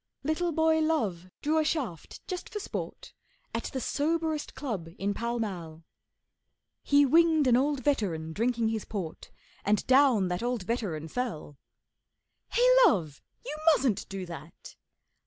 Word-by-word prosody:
Little 315 +4 0
boy 320 0 +3
Love 220 - 0
drew 310 +2 +2
a - - +3
shaft 260 - -3
just 365 -1 -5
for 420 - -5
sport - - -6 0.4
At - - -3
the 265 - -3
soberest 315 +3 -1
club 210 - -4
in 200 +1 -1
Pall 235 +3 -2
Mall; 170 -8 -5 1.0
He 285 0 +4
winged 320 +1 +4
an 250 -2 +5
old 275 +1 +1
veteran 170 - 0
drinking 230 +2 +1
his 220 -2 -2
port, 185 -7 -6 0.3
And 210 0 +1
down 255 -7 +5
that 180 +1 -2
old 240 -3 -1
veteran 180 -8 -3
fell. 160 - -4 0.9
'Hey, - - +3 0.2
Love, 165 - +2 0.2
you 300 - -4 0.2
mustn't 250 -7 -1
do 195 -2 -5
that! 170 -1 -11
240 Hz, 140 wpm, -29 LUFS, 185-300 Hz, 1.0 s, an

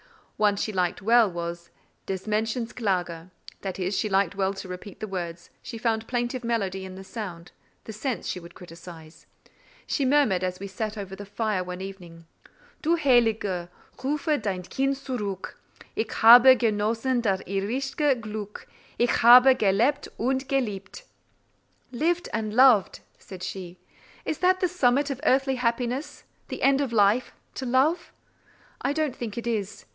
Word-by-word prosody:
One 210 -1 +3
she 215 +1 -3
liked 180 -1 -1
well 230 0 +5
was 170 -1 -6 0.4
"Des 190 -1 -4
Mädchens 225 +2 -1
Klage:" 180 -6 -2 0.3
that 190 -2 -5
is, 185 +1 -2
she 215 - -1
liked 195 -2 +2
well 195 0 -1
to 195 - -8
repeat 180 +2 -9
the - - -4
words, 175 -3 -6
she 230 - -7
found 225 -1 -1
plaintive 245 +1 -2
melody 195 -5 -2
in 190 0 -8
the 190 - -9
sound; 185 -5 -7 0.3
the 220 - -8
sense 220 0 -3
she 180 - -3
would 170 -1 -14
criticise. 165 -2 -13 0.6
She 285 - -1
murmured, 260 -9 +3
as 185 0 -2
we 200 - -6
sat 215 +3 -4
over 195 -2 -6
the 205 0 -10
fire 210 -2 -1
one 180 0 -7
evening:— 175 -4 -10 0.6
Du 330 +2 +2
Heilige, 225 - +2 0.3
rufe 295 +1 0
dein 190 -4 -3
Kind 270 +8 -1
zurück, 225 -9 -5 0.4
Ich 220 0 -2
habe 245 +3 +10
genossen 230 +3 0
das 195 -4 0
irdische 260 +7 -1
Glück, 210 -2 -7 0.3
Ich 240 0 +1
habe 250 +3 +9
gelebt 235 +7 +1
und 265 +3 -1
geliebet! 220 - -3 0.9
"Lived 335 +7 0
and 215 -1 -2
loved!" 250 -6 +5 0.2
said 185 -2 -10
she, 185 -1 -6 0.5
"is 310 - -3
that 370 +1 +3
the 365 - +3
summit 285 -4 +1
of 275 0 -5
earthly 270 -2 +2
happiness, 250 +4 -2 0.2
the - - -6
end 275 +1 +4
of 275 -4 -2
life—to 230 +4 0
love? 270 +8 +1 0.7
I 275 - 0
don't 305 -3 -1
think 230 -3 -6
it 235 - -4
is. 210 -4 -3
220 Hz, 155 wpm, -26 LUFS, 190-255 Hz, 0.9 s, habe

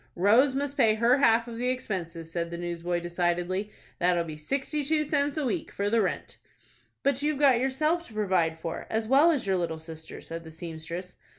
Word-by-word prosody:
"Rose 230 +9 +4
must 280 +1 -2
pay 225 -5 +4
her 235 +4 +4
half 230 -3 +4
of 230 -1 -7
the 250 +1 0
expenses," 170 -9 -4
said 170 0 -2
the 170 - -5
newsboy, 175 0 -2
decidedly. 175 +3 -1 0.3
"That'll 175 -1 +2
be 160 -2 -7
sixty 275 - -2
two 305 +2 +1
cents 290 0 0
a 300 - 0
week 235 - -2
for 205 +1 -2
the 230 -1 +4
rent." 190 - -3 0.6
"But 280 -1 +1
you've 300 0 0
got 270 -4 +5
yourself 305 +7 0
to 225 - -14
provide 185 -6 +1
for, 165 0 -5
as 220 0 -1
well 280 +7 +6
as 290 -10 +1
your 190 -1 +1
little 165 -2 -2
sister," 160 0 -8
said 165 0 -7
the 160 - -10
seamstress. 165 +2 -7
205 Hz, 200 wpm, -28 LUFS, 170-265 Hz, 0.6 s, well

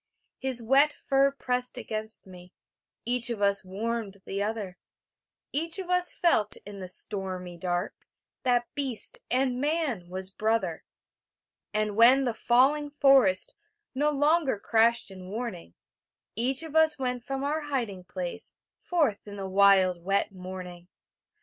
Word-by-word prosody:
His 260 -3 -1
wet 275 +5 +4
fur 275 0 +4
pressed 250 -2 -2
against 220 0 -5
me; 180 -1 -13 0.5
Each 245 0 0
of 235 -3 -3
us 200 -1 +3
warmed 200 0 -4
the 195 +1 -3
other; 205 -4 -3 0.7
Each 330 +4 -1
of 370 -2 -4
us 360 0 +2
felt 215 - +1
in 205 -1 -9
the 185 -1 -7
stormy 185 -2 -3
dark 175 0 -2 0.5
That 245 -1 +2
beast 280 - -2
and 255 0 +1
man 290 - -1
was 190 +1 -5
brother. 215 -6 0 0.9
And 210 -1 -1
when 250 +5 +6
the 245 -3 0
falling 270 +6 +3
forest 270 -10 +4 0.4
No 290 +3 +2
longer 295 -2 +2
crashed 225 +1 +2
in 185 -1 -10
warning, 205 - -5 0.6
Each 260 +7 0
of 320 -1 -8
us 320 -1 +4
went 250 -2 -2
from 270 +2 -3
our 300 +3 0
hiding 240 -11 -3
place 180 -1 -4 0.2
Forth 295 - 0
in 205 - -8
the 195 -1 -5
wild 190 -2 +4
wet 195 +3 +1
morning. 180 -2 -8
225 Hz, 140 wpm, -28 LUFS, 190-270 Hz, 0.9 s, when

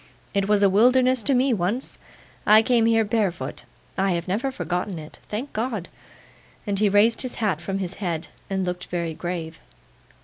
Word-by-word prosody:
'It 200 -1 +1
was 205 -1 +3
a - - +7
wilderness 250 +5 +4
to 275 +3 +2
me 255 +1 +3
once. 210 +6 -2 0.5
I 215 +1 +7
came 230 -1 +3
here 225 -1 +3
barefoot. 190 - -2 0.3
I 195 -1 +2
have 170 +1 -3
never 215 +9 0
forgotten 180 -6 -3
it. 155 0 -10
Thank 235 +7 -4
God!' 220 -5 -3 0.8
and 200 -2 -1
he 210 -1 +4
raised 210 +3 +4
his 255 -2 -4
hat 195 -8 -1
from 195 +3 -3
his 190 -2 -3
head, 170 -3 -2 0.2
and 190 -1 -1
looked 180 0 -4
very 170 -2 -2
grave. 165 -1 -5
200 Hz, 175 wpm, -24 LUFS, 180-230 Hz, 0.8 s, a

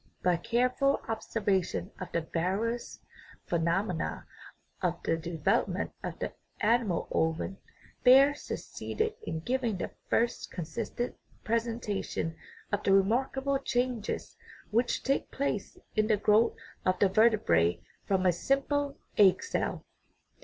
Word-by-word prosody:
By 180 -1 +4
careful 250 - +2
ob 225 -1 -1
servation 195 -3 -1
of 185 - -6
the 170 - 0
various 195 +9 -2 0.5
phenomena 170 +1 -1 0.6
of - - +1
the 165 - +2
development 170 +6 0
of - - -4
the - - -4 0.3
animal 225 -5 +2
ovum 160 +4 0 0.4
Baer 270 +3 +8
succeeded 440 +8 -3
in 160 - -4
giving 240 0 0
the - - -4 0.2
first 235 +1 +1
consistent 230 +8 -4 0.3
presentation 225 -7 -1 0.4
of 205 0 0
the 195 - +3
remarkable 265 +7 +2
changes 245 -4 -2 0.4
which 235 +3 +1
take 275 +1 0
place 260 -7 -2 0.2
in 215 0 +3
the 215 -2 +3
growth 215 +3 +4 0.3
of 185 0 +2
the 200 - +4
vertebrate 90 - +3 0.2
from 190 -1 +2
a 180 - +6
simple 275 - 0 0.2
egg 195 - +6
cell. 455 - -2
215 Hz, 120 wpm, -30 LUFS, 180-245 Hz, 0.6 s, Baer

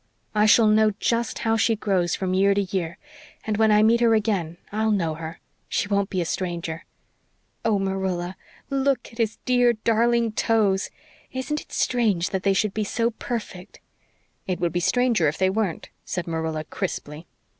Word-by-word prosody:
I 210 0 +3
shall 220 +2 +6
know 215 0 +4
just 235 -1 0
how 225 0 +3
she 225 0 +2
grows 190 -5 0
from 185 -1 -2
year 195 +1 +3
to 200 - +2
year 175 -3 -3 0.5
and 215 -1 -1
when 220 0 +4
I 210 0 +5
meet 230 +2 +4
her 230 -1 +4
again 195 -6 -1
I'll 220 +1 0
know 175 -7 +1
her 160 +1 -7 0.3
she - - 0
won't 200 0 +1
be 185 - -2
a - - -1
stranger. 170 -2 -4 0.8
Oh, 220 -2 +2
Marilla, 190 -2 -2 0.4
LOOK 275 -2 0
at 230 - -16
his 225 -1 0
dear, 245 -1 +4
darling 230 +1 +2
toes! 210 -3 +1 0.4
Isn't 260 +3 -3
it - - -18
strange 215 -8 +1
they 195 +1 +1
should 205 0 0
be 215 - -1
so 230 +3 0
perfect?" 215 -5 -6 0.7
"It 185 -2 -2
would 170 -2 0
be 175 - +1
stranger 235 -3 +2
if 145 - -1
they 190 0 +2
weren't," 200 -4 -2
said 175 - -4
Marilla 160 -2 -2
crisply. 155 -2 -5
205 Hz, 175 wpm, -24 LUFS, 180-225 Hz, 0.8 s, shall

